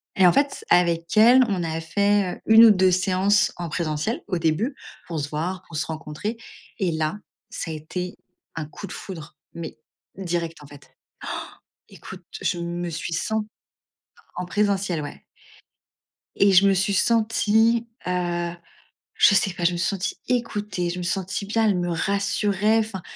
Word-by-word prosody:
et 185 -2 +6
en 175 - +5
fait, 280 0 0
avec 170 0 +2
elle, 240 +4 +7
on 190 -5 -1
a 160 0 -2
fait, 200 +3 +1
heu, - - -23
1 225 +1 +8
ou 225 - +9
2 185 -1 +4
séances 190 +3 +2
en 170 -1 -4
présentiel, 155 +6 -2
au 180 -4 -1
début, 170 - 0 0.3
pour 165 -2 -4
se 145 0 -3
voir, 180 +5 -3
pour 165 - -7
se - - -1
rencontrer 160 +7 -5 0.4
et 185 -4 +1
là, 160 +5 -1 0.3
ça 165 - -5
a - - -4
été 180 +4 -5 0.4
un 160 - -3
coup 155 +7 -9
de - - -11
foudre, 160 -6 -9 0.2
mais 165 -2 -7 0.4
direct, 170 -4 -3
en - - -12
fait. 145 -1 -14
Han! - - -27 1.0
Écoute, - - -11 0.2
je - - 0
me 175 0 -3
suis 170 +1 -5
sent 220 +6 -2 1.0
en 180 - -3
présentiel, 195 -4 0
ouais. 145 - -9 1.1
Et 200 0 +4
je 195 +1 +6
me 195 - +4
suis 195 +2 +1
sentie, 225 +2 +2 0.2
heu 175 -1 -1 0.7
je - - +6
sais 195 -1 +2
pas, 175 - -6
je 170 - +4
me - - -3
suis 170 - 0
sentie 195 -1 -2
écoutée, 210 -7 -1
je 175 - -4
me 180 - -4
suis 175 - 0
sentie 190 +1 -3
bien, 225 +2 +1
elle 200 -3 +2
me 175 - -1
rassurait. 200 +4 +1
Enfin, 215 -4 -3
185 Hz, 175 wpm, -24 LUFS, 170-205 Hz, 1.1 s, ou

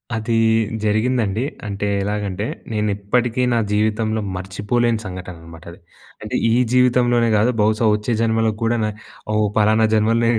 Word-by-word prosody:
అది 110 +1 -2 0.5
జరిగిందండి. 110 0 0 0.2
అంటే 100 0 -3 0.2
ఎలాగంటే 105 -1 -3 0.3
నేనిప్పటికీ 105 +3 -1
నా 120 - +2
జీవితంలో 110 +1 0
మర్చిపోలేని 105 +5 -1
సంఘటన 90 -1 -7
అనమాట 80 -1 -13
అది. 85 - -14 0.4
అంటే - - -5 0.2
ఈ - - +3 0.2
జీవితంలోనే 120 -2 +3
కాదు 110 +4 +3
బహుశా 110 +2 +2
వచ్చే 105 +3 -2
జన్మలో 115 -1 +1
కూడా, 115 +1 +1 0.5
ఓ - - -1 0.2
ఫలానా 110 +1 +3
జన్మలో 110 +2 +2
నేను 115 0 +2
110 Hz, 135 wpm, -20 LUFS, 105-115 Hz, 0.5 s, ఈ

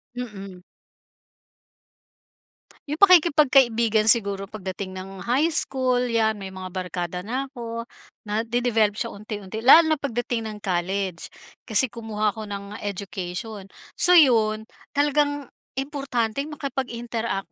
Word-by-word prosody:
Mm. 200 -6 -7 2.3
Yung 295 - -2
pakikipagkaibigan 265 - +5
siguro 200 -4 +3
pagdating 190 -2 -6
ng 190 0 -8
high 290 +7 +2
school 255 -4 +1
yan 220 -2 +1
may 195 - -6
mga 185 -1 -8
barkada 180 -1 -4
na 245 +8 -3
ako, 230 -2 -6 0.4
nade-develop 225 0 0
siya 230 +1 -2
unti-unti 210 0 -7
lalo 315 +7 +7
na 305 - +1
pagdating 240 -4 -2
ng 210 -1 -7
college. 185 -1 -2 0.4
Kasi 225 +1 +3
kumuha 215 -1 -2
ako 215 0 -8
ng 200 0 -7
education. 200 0 -5 0.3
So 360 0 +5
yun, 220 -8 +5 0.3
talagang 290 -1 +1 0.2
importanteng 275 -2 -2
makipag-interact 240 - -4
225 Hz, 110 wpm, -24 LUFS, 200-260 Hz, 2.3 s, lalo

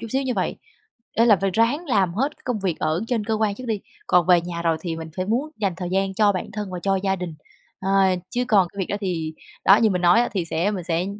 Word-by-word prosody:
chút 230 - -6
xíu 270 +3 0
như 255 -2 -1
vậy. - - -1 0.6
Ê, 230 +1 +3
là 210 - +7
phải 195 +1 -1
ráng 235 - +2
làm 195 - +1
hết 275 +7 -1
cái - - -19
công 245 -4 -1
việc 185 -4 -1
ở 155 +2 0
trên 230 -4 0
cơ 220 +1 -1
quan 215 -2 0
trước 255 +5 -9
đi, 220 -3 -1 0.3
còn 175 -2 +3
về 180 -2 +6
nhà 170 0 -5
rồi 165 -1 +2
thì 165 -1 -4
mình 160 0 -7
phải 185 0 -2
muốn 255 +8 -1
dành 200 -3 0
thời 180 -1 -4
gian 195 +1 0
cho 210 0 +4
bản 185 - -4
thân 210 -3 -5
và 180 - -4
cho 195 -1 +2
gia 190 0 0
đình. 175 -3 -5 0.5
Ờ, 190 - -3 0.4
chứ 245 +1 0
còn 195 -5 +4
cái 200 - -15
việc 190 - -1
đó 205 - -2
thì 165 -5 -3 0.3
đó, 195 - +8
như 225 -1 +3
mình 180 -2 -1
nói 175 +7 +6
á, 240 - +1
thì 190 -4 -1
sẽ 165 +4 0
mình 185 -5 -4
sẽ, 170 +2 0
195 Hz, 285 wpm, -23 LUFS, 175-220 Hz, 0.6 s, đó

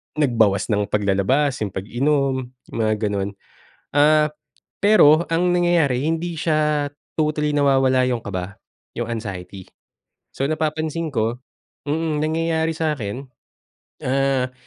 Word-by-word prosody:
Nag-bawas 115 -8 +2
ng 105 -1 +1
paglalabas 105 +8 +1
yung 100 -4 -4
pag-inom, 130 +5 0 0.2
yung - - -7
mga 110 -1 +2
ganon. 100 -1 -1 0.6
Ah, 150 +1 +4 0.4
pero 170 -6 +5
ang 175 +2 +1
nangyayari 170 -7 +2
hindi 165 +1 -2
siya 150 -2 +1 0.3
totally 150 -1 +1
nawawala 135 -3 +3
yung 125 -2 -1
kaba, 95 -2 -5 0.4
yung 120 0 -4
anxiety. 100 -5 -6 0.7
So - - -7
napapansin 155 0 -2
ko 115 0 0 0.5
mm, 155 +1 -1
nangyayari 160 +1 0
sa 155 -2 -1
akin, 125 +4 -6 0.8
ah, 135 -1 +1
140 Hz, 115 wpm, -21 LUFS, 115-155 Hz, 0.8 s, pero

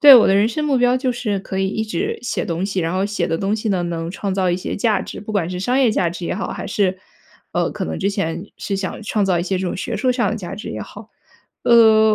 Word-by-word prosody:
对， 285 -2 +11
我 235 - +8
的 195 - +4
人 205 +3 +4
生 300 +6 -2
目 280 -3 +2
标 245 +1 +4
就 255 -1 0
是 215 -4 -2
可 190 0 -5
以 190 0 +1
一 220 +2 -2
直 410 - -2
写 - - -2
东 175 -1 -2
西， 195 -2 -1
然 165 +1 -1
后 190 +1 +1
写 205 -4 -1
的 165 - 0
东 195 +4 0
西 220 0 -2
呢， 185 -3 +1
能 165 -1 -3
创 195 0 -3
造 185 -2 +2
一 175 - +1
些 185 - -4
价 215 0 +1
值， - - -8
不 215 - -7
管 190 -5 0
是 180 0 -4
商 250 +6 +1
业 250 -4 +4
价 180 -5 +1
值 175 0 -6
也 - - -1
好， 195 - -3
还 - - -5
是， 190 -2 0 0.5
呃， - - +1
可 - - -4
能 80 - -4
之 200 - +1
前 170 -3 -2
是 200 - -3
想 195 +3 -3
创 210 -1 0
造 180 -3 +2
一 - - 0
些 185 0 -1
这 190 - -2
种 - - -2
学 - - -3
术 255 -2 +1
上 240 -5 +1
的 220 - -2
价 195 -2 -6
值 215 - -7
也 - - -5
好。 - - -10 0.5
呃， 220 -2 +6
200 Hz, 310 characters per minute, -20 LUFS, 185-225 Hz, 0.5 s, 对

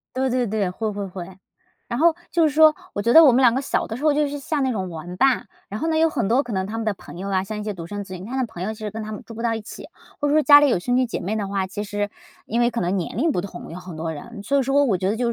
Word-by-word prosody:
对 265 0 +1
对 250 -1 +1
对， 205 -3 -1
会 215 +4 -3
会 200 -1 -4
会。 185 0 -9 0.5
然 235 - -3
后 335 0 +5 0.2
就 335 0 +3
是 - - +1
说， 310 0 +7 0.2
我 205 - -2
觉 235 +3 +2
得 325 - +10
我 265 - +7
们 255 - +4
两 240 -3 +6
个 265 - 0
小 275 - -1
的 225 - -5
时 285 - -8
候 300 - +5
就 300 +1 +2
是 285 0 -4
像 285 0 -1
那 260 - +1
种 190 -5 -3
玩 175 +2 -8
伴， 260 -1 +3 0.2
然 210 - -5
后 325 - 0
呢， 315 - +1
有 320 0 +4
很 240 -8 -1
多 245 +4 +4
可 240 -6 -6
能 190 0 -1
他 220 +3 -5
们 225 - -3
的 215 - +1
朋 175 - -12
友 195 - -5
啊， 190 -1 +1
像 210 +2 -5
一 - - -5
些 210 - -2
独 170 -3 -8
生 205 +4 -5
子 190 - -9
女， 180 - -10
他 230 - -8
们 265 - -1
的 250 - -1
朋 180 -5 -7
友 210 - -2
其 220 - -14
实 215 - -4
跟 220 +1 -6
他 215 - -6
们 210 - -6
住 230 - -10
不 230 - -7
到 230 -1 +1
一 225 - -5
起。 210 - -10 0.4
或 290 - +1
者 - - +2
说 310 - +5
家 290 -1 +8
里 290 - +4
有 210 - +2
兄 245 +6 0
弟 255 - +3
姐 235 - -4
妹 205 +4 -3
的 205 -3 -2
话， 195 -1 -1
其 205 +2 -5
实 205 0 -3 0.4
因 235 +3 0
为 240 0 +3
可 235 - -2
能 180 +2 0
年 185 +2 -3
龄 320 +6 +2
不 180 - 0
同 190 -2 -8
有 170 - -7
很 180 -3 -9
多 160 0 -3
人。 205 +8 -9
所 280 +7 +1
以 - - +3
说， 280 +2 +3
我 210 -8 +1
觉 185 +2 -1
得 220 - -1
就 245 - 0
220 Hz, 385 characters per minute, -23 LUFS, 195-265 Hz, 0.5 s, 得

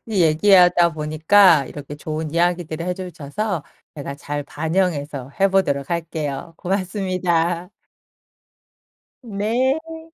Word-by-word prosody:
이 205 -5 +1
얘기 160 +5 +3
하다 175 -2 +6
보니까 155 +1 +4
이렇게 145 +1 -8
좋은 155 +1 -4
이야기들을 170 -1 0
해 180 - -1
주셔서 180 +1 -4 0.3
제가 140 -2 -6
잘 145 +1 -5
반영해서 150 -4 -2
해 195 - +5
보도록 145 -7 0
할게요. 160 -2 -4
고맙습니다. 180 -3 -1 1.5
네. 260 +9 -1
170 Hz, 250 characters per minute, -21 LUFS, 150-190 Hz, 1.5 s, 하다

